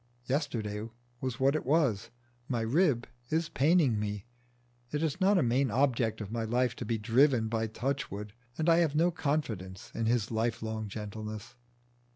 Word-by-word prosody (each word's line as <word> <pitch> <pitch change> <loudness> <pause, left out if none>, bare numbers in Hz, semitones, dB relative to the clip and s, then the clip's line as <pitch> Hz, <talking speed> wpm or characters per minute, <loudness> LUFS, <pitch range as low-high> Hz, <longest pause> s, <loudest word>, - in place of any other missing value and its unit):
Yesterday 115 -7 -2 0.3
was 130 -3 -3
what 135 +2 +3
it 155 - -1
was, 135 -8 +2 0.4
my 120 -3 0
rib 125 +1 +2 0.2
is 160 +1 0
paining 150 -6 +3
me, 105 -1 -3 0.7
it 150 +1 -1
is 160 +4 -1
not 195 +1 +5
a 170 - +3
main 125 +3 +2
object 120 -3 +1
of 105 -1 -6
my 115 0 -1
life 120 +2 +1
to - - -4
be 115 - 0
driven 120 +2 +3
by 110 0 -1
Touchwood 110 -4 -3 0.2
and 160 - -1
I 165 -1 +6
have 165 -4 +2
no 170 +3 +4
confidence 115 - -3
in 115 - -1
his 115 -2 +1
lifelong 110 -1 -1
gentleness. 105 +2 -6
120 Hz, 165 wpm, -31 LUFS, 110-145 Hz, 0.7 s, I